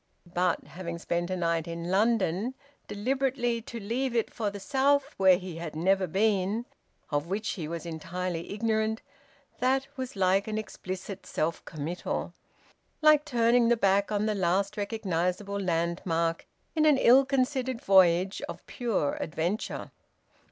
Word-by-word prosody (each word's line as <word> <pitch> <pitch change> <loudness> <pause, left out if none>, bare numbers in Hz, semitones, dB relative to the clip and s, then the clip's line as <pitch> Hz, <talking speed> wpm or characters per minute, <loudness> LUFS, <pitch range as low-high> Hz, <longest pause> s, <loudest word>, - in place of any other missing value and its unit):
But, 180 -1 +1
having 170 -2 -6
spent 175 +1 -2
a 185 - -1
night 165 -2 0
in 170 +1 -4
London, 210 +2 +1 0.3
deliberately 245 +1 0
to 235 +1 -7
leave 240 +4 -2
it 230 - 0
for 215 -3 -1
the 205 0 -7
South, 280 +5 +2
where 190 -2 +6
he 180 -3 -7
had 165 -2 -6
never 190 +3 +2
been, 205 +4 +1 0.5
of 145 +2 0
which 205 +4 -2
he 160 -5 -3
was 170 +1 -5
entirely 170 +1 -4
ignorant, 220 +1 0 0.6
that 265 +2 +2
was 260 -2 -5
like 195 +1 +2
an 215 0 -2
explicit 190 -2 -6
self 165 +2 -2
committal, 160 +3 -4 0.7
like 305 -1 +6
turning 235 -3 +3
the 240 - +4
back 200 -1 +2
on 210 0 +1
the 215 - +1
last 190 +1 +1
recognisable 200 -2 -2
landmark 170 -2 -1 0.3
in 310 -1 +4
an 295 -3 +6
ill 260 +1 +7
considered 260 -2 0
voyage 190 -1 +4
of - - -8
pure 225 - -1
adventure. 170 +6 -3
200 Hz, 145 wpm, -28 LUFS, 175-235 Hz, 0.7 s, ill